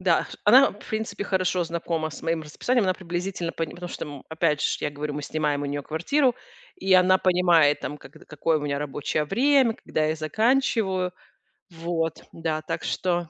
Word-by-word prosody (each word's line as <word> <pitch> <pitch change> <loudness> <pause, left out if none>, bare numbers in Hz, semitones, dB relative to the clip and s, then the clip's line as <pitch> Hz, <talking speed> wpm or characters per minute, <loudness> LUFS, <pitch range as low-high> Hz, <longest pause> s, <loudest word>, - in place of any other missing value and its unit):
Да, 180 -3 +3
ш - - -11
она, 255 +6 +7
в 205 - -16
принципе, 220 -1 -3
хорошо 185 -2 +1
знакома 165 -1 -2
с - - -9
моим 165 -1 -1
расписанием, 225 +10 0
она 185 -1 +1
приблизительно 175 -1 -4
пон 165 -2 -3
потому 175 0 -8
что, - - -5
м, 145 -3 -9
опять 160 -2 +1
же - - +2
ш - - -1
я 150 - 0
говорю, 145 0 -5
мы 150 - -4
снимаем 150 -2 -1
у - - -2
неё 145 0 -3
квартиру, 245 - +1 0.4
и 195 - 0
она 185 0 +6
понимает, 175 -5 +4
там, 145 - -5
когд 150 +3 -15
какое 155 +1 0
у - - -7
меня 140 -1 -2
рабочее 150 +1 -2
время, 255 - +3
когда 155 - -2
я 155 - 0
заканчиваю. 205 - +1 0.6
Вот, 165 -1 -3
да. 160 -1 -2
Так - - -4
что, 175 -2 -1
170 Hz, 195 wpm, -25 LUFS, 155-190 Hz, 0.6 s, она